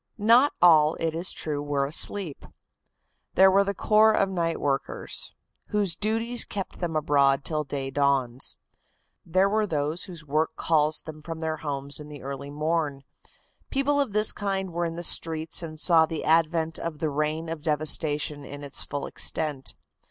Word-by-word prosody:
Not 235 +6 +5
all, 155 -3 +6
it 165 -1 -2
is 170 +3 +1
true, 150 -2 -3
were 145 -1 0
asleep. 160 +2 -2 0.9
There 190 0 +7
was 195 +1 +3
the 200 - -1
corps 215 +2 +4
of 195 - +2
night 170 -3 -1
workers, 140 -1 -3 0.3
whose 205 -5 0
duties 225 +3 +2
keep 195 -2 -6
them 170 -3 -3
abroad 140 -2 +2
till 155 -1 -1
day 135 -1 -4
dawns. 135 -3 +1 0.7
There 185 +4 +2
were 215 +1 +1
those 155 +1 -2
whose 170 -5 -10
work 155 +2 0
calls 155 -1 +1
them 155 -1 -9
from 165 +1 -7
their 160 -1 -2
homes 140 -1 -4
in 150 0 -10
the 145 -2 -10
early 140 +1 -6
morn. 150 -1 -2 0.7
People 285 +1 +1
of 275 - -1
this 215 +1 +4
kind 195 -2 -2
were 175 +1 -1
in 165 0 -4
the 175 - -5
streets 160 -1 0
and 155 -2 -7
saw 160 -1 +5
the 160 -1 -4
advent 165 0 +2
of 165 -2 -4
the 155 0 -2
reign 155 +3 -1
of 160 -1 -5
devastation 150 -1 0
in 145 +1 -9
its 140 - +1
full 145 0 -4
extent. 145 -4 -3
160 Hz, 170 wpm, -26 LUFS, 145-185 Hz, 0.9 s, There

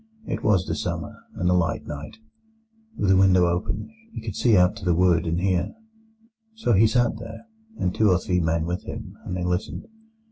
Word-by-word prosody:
It - - -4
was 95 -4 +3
the - - -2
summer, - - -4 0.2
and 90 - -1
a 90 - +4
light 85 -3 0
night. 75 +7 -7 0.8
With 100 - 0
the 95 - +6
window 95 -2 +5
open, 90 - -2 0.2
he - - -6
could 110 -4 -5
see 115 -5 +4
out 90 +3 +4
to 110 - -10
the 90 -2 +2
wood, 85 -1 +3
and 85 +1 0
hear. 95 - 0 0.8
"So 125 - +1
he 110 +3 +6
sat 120 0 +1
there, 115 - -9 0.3
and 90 - -1
two 110 -1 +3
or 90 - +4
three 90 0 0
men 80 -1 0
with 90 +1 -3
him, - - -7
and 90 - -3
they 90 - -3
listened. 90 +2 -2
90 Hz, 205 wpm, -24 LUFS, 90-105 Hz, 0.8 s, the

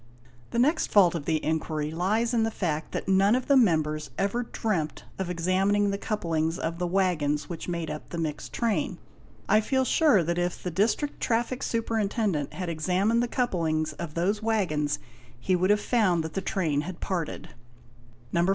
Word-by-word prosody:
"The - - -4
next 300 +7 +3
fault 185 -5 +5
of 160 -4 -4
the 160 -2 0
inquiry 155 -1 -1
lies 215 +8 0
in 235 - +3
the 225 - +2
fact 160 -7 -3
that - - -4
none 195 +3 +4
of 255 - -1
the 280 - +4
members 155 - +2
ever 200 +5 0
dreamt 210 -9 -2 0.2
of 190 - -1
7 - - -3
examining 195 +4 +2
the 200 - -3
couplings 165 -6 -1
of 165 0 -3
the 180 - 0
waggons 155 -6 0
which 170 - -6
made 170 -2 -3
up 150 - -7
the 170 - -5
mixed 155 -3 -3
train. 230 -3 -1 0.5
I 215 - +5
feel 260 +4 +1
sure 265 - +4
that 170 +2 -1
if 175 0 -2
the 180 - -2
District 225 - 0
Traffic 240 +2 0
Superintendent 215 - -1
had 180 -1 -4
examined 185 +8 +1
the 240 - 0
couplings 160 -11 0
of 150 0 -7
those 195 +5 0
waggons, 180 -10 0 0.4
he 185 +9 +1
would 185 +2 +1
have 210 0 +4
found 205 -8 +2
that 160 - -6
the 195 - -2
train 160 -8 0
had 175 +2 -7
parted... 175 -5 -3 0.8
"No. 170 +1 +2
185 Hz, 185 wpm, -27 LUFS, 160-215 Hz, 0.8 s, fault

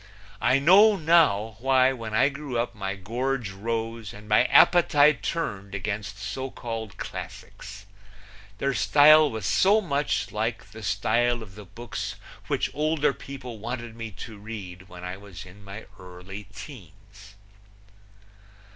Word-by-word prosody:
I 130 - +4
know 195 +9 +6
now 150 - +3
why 130 +1 +3
when 115 -4 -7
I 130 +5 +4
grew 140 -3 -5
up 120 +1 -1
my 100 -2 -4
gorge 120 +3 -3
rose 115 +2 -4
and 105 +1 -13
my 105 +3 +4
appetite 150 - +5
turned 100 - -4
against 100 +1 -4
so 130 +7 -5
called 115 -6 -6
classics. 105 +1 -9 0.7
Their 140 +5 0
style 150 +5 +6
was 110 -4 -5
so 195 - +4
much 145 -7 -1
like 110 +2 -2
the 110 +1 -10
style 115 +4 0
of 95 -3 -14
the 105 +1 -11
books 110 +5 -6 0.3
which - - -1
older 150 -1 +1
people 125 -6 -9
wanted 120 0 -6
me 115 -1 -6 0.2
to 110 -3 -11
read 95 -4 -9
when 90 0 -11
I 90 +1 -5
was 95 -3 -11
in 95 +3 -15
my 100 +3 -9
early 90 +3 -10
teens. 100 - -13
115 Hz, 140 wpm, -26 LUFS, 100-135 Hz, 0.7 s, know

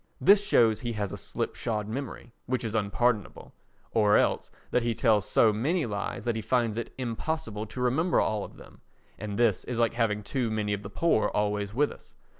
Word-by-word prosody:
This 200 +1 +6
shows 115 - +3
he 120 -2 -3
has 105 -3 -3
a - - -4
slipshod 105 -2 -3
memory, 120 0 -6 0.2
which 130 0 -1
is 110 -2 -3
unpardonable, 110 +1 -1 0.4
or 105 -2 +4
else - - +1 0.2
that 125 - +2
he 115 -1 -1
tells 105 -3 +2
so 110 -2 +4
many 150 - 0
lies 105 +1 -4
that 120 -2 0
he 110 - -2
finds 120 -2 +1
it 115 0 -4
impossible 120 -2 -3
to 125 - -7
remember 155 +8 +2
all 105 -2 0
of - - -11
them, - - -15 0.4
and 100 -1 -5
this 115 -5 +2
is 125 - -4
like 115 -1 +2
having 110 -3 0
too 120 +2 -1
many 105 -1 -1
of 100 - -3
the 100 - -8
poor 165 -10 +2
always 105 0 -1
with 145 +2 +2
us. - - -15
115 Hz, 200 wpm, -28 LUFS, 105-125 Hz, 0.4 s, This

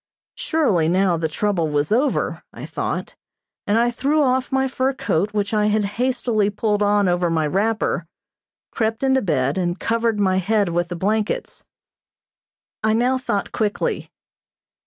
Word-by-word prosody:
Surely 205 - +1
now 185 0 +2
the 160 -1 -1
trouble 170 -1 -1
was 145 +2 0
over, 260 +6 +1
I - - -8
thought, - - -4 0.5
and 205 +2 +2
I 240 +1 +3
threw 285 +5 +1
off 260 0 +1
my 265 0 +2
fur 260 +1 0
coat 205 -5 -1
which 205 0 -2
I 210 -1 +2
had 210 0 +1 0.2
hastily 240 -5 +1
pulled 210 0 -1
on 205 -1 +3
over 175 -1 +1
my 160 -2 +1
wrapper, 195 0 0 0.6
crept 225 +2 -1
into 265 0 +3
bed 145 - 0
and 175 0 -1
covered 230 -1 0
my 190 -2 +2
head 200 +1 +1
with 175 +1 0
the 175 - -5
blankets. 210 +4 -2 1.2
I 220 0 +3
now 250 +3 +2
thought 210 -6 -2
quickly. 210 -2 -2
210 Hz, 155 wpm, -21 LUFS, 180-235 Hz, 1.2 s, I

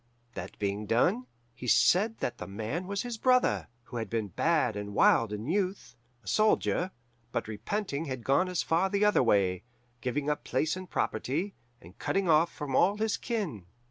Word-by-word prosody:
That 95 -1 -7
being 100 +1 -2
done, 120 +3 +2 0.3
he 125 - -8
said 210 - +4
that 120 0 -2
The - - -6
Man 115 - -4
was 200 0 -2
his 240 -2 -5
brother, 255 0 +3 0.2
who 120 - -8
had 110 -3 -3
been 110 -3 -2
bad 145 - +1
and 105 0 -5
wild 115 -2 +4
in 105 +1 -4
youth, 185 -3 -2 0.3
a - - -18
soldier; 215 - +2 0.4
but 115 - -2
repenting 145 - -3
had 130 -5 -5
gone 140 +9 +2
as 180 - 0
far 175 +4 +2
the 200 +1 +2
other 210 - +4
way, 95 -6 +2 0.4
giving 140 +3 -2
up 150 0 -1
place 160 +2 0
and 185 -1 -8
property, 155 - -1 0.3
and 90 +4 -16
cutting 195 -1 0
off 165 +1 +4
from 140 -4 -4
all 200 +8 +4
his 220 0 0
kin. 180 - -4
145 Hz, 180 wpm, -29 LUFS, -, 0.4 s, said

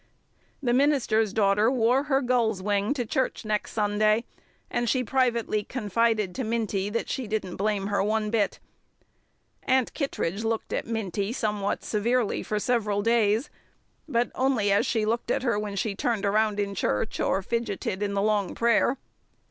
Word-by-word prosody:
The 240 -2 +2
minister's 245 -6 +2
daughter 210 +1 +3
wore 255 +2 +2
her 275 -2 +1
gull's 235 -5 +1
wing 205 +2 0
to 245 -4 -2
church 260 +3 -1
the 215 - -8
next 210 -1 -1
Sunday, 215 +1 +2 0.4
and 240 -1 -1
she 255 +2 +1
privately 235 -4 +1
confided 220 -3 0
to 260 - -3
Minty 215 -3 -1
that 230 +2 -2
she 260 -4 -3
"didn't 205 -4 -3
blame 205 -1 0
her 200 -1 0
one 215 +1 0
bit." 215 -3 0 1.0
Aunt 260 -2 +1
Kittredge 220 - -2
looked 225 0 -2
at - - -2
Minty 205 -2 -2
somewhat 210 -4 -2
severely 230 +2 0
for 210 - -2
several 210 -3 0
days 225 +2 +2 0.6
but 240 -2 +1
only 255 -6 +1
as 200 - +3
she 220 -2 +1
looked 230 +2 -1
at - - 0
her 230 -5 +1
when 210 -1 -4
she 205 +1 -1
turned 215 0 -1
around 210 +1 +2
in 200 -1 -1
church 105 - -1
or 195 - +1
fidgeted 210 -3 -2
in 200 -1 -1
the 200 - +1
long 210 -2 0
prayer. 235 +3 +2
220 Hz, 165 wpm, -26 LUFS, 205-235 Hz, 1.0 s, daughter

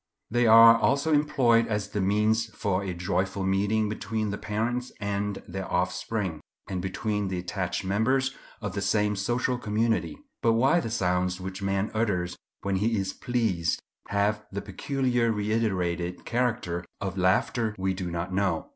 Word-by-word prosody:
They 120 0 +3
are 115 +1 +9
also 140 +5 +2
employed 125 -6 +3
as 105 -2 -2
the 105 - -2
means 105 +3 +2
for 100 -2 0
a 95 - -3
joyful 95 +2 -1
meeting 100 +3 +1
between 110 0 -2
the 100 - -3
parents 120 +4 -2
and 100 0 -2
their 95 +1 -5
offspring, 90 -1 -1 0.3
and 95 -2 -3
between 105 +2 -2
the 95 -1 -2
attached 90 +1 -3
members 130 +7 +1 0.3
of 105 -3 -4
the 100 - -2
same 105 0 +1
social 120 +5 0
community. 115 - 0 0.2
But 115 - +4
why 135 +9 +4
the 115 - -3
sounds 90 -4 0
which 95 +1 -6
man 100 +1 0
utters 95 -6 0 0.3
when 100 -1 0
he 110 +3 +1
is 95 -1 -2
pleased 105 -10 0 0.3
have 105 +1 0
the 100 +1 -4
peculiar 125 +2 0
reiterated 95 -5 -1
character 115 -8 -1 0.2
of 95 -2 -3
laughter 105 +4 +1
we 95 0 0
do 90 -1 -4
not 85 +2 -3
know. 95 -4 0
105 Hz, 155 wpm, -27 LUFS, 95-115 Hz, 0.3 s, are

